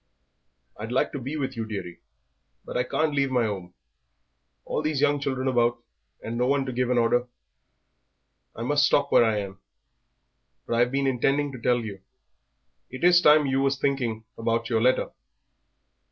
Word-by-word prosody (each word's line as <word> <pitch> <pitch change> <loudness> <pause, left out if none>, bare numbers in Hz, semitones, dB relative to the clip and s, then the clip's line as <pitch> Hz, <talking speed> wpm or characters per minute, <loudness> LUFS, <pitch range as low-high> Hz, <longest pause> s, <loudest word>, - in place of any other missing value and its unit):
"I'd 110 +3 -6
like 130 - +1
to 140 - -5
be 135 +5 -5
with 135 -3 -3
you, 115 - -3
dearie, 100 -6 -6 0.7
but - - -8
I 125 - +2
can't 155 +4 -1
leave 140 -1 +1
my 125 -3 +1
'ome, 95 -4 -5 0.9
all - - -2
these 155 -2 -1
young 145 0 +2
children 135 -2 -2
about 120 -2 +2 0.5
and 115 +1 -4
no 125 - +2
one 140 0 +1
to 130 - -4
give 125 0 -1
an 125 - +1
order. 120 +1 +2 1.3
I 115 - -5
must 145 +4 +2
stop 140 0 +1
where - - +6
I 110 -2 +1
am. 100 -2 -5 1.1
But 115 - -1
I've 120 +1 +2
been 140 0 0
intending 135 +2 +1
to 130 -3 -10
tell 120 +1 +2
you 100 -4 -7 0.9
it 130 +5 -9
is 175 0 +6
time 150 -1 +6
that 135 - -1
you 135 0 +1
was 135 0 +1
thinking 125 -5 -1 0.2
about 115 +1 -1
yer 110 -1 +2
letter." 130 +2 +2
125 Hz, 180 wpm, -25 LUFS, 115-140 Hz, 1.3 s, where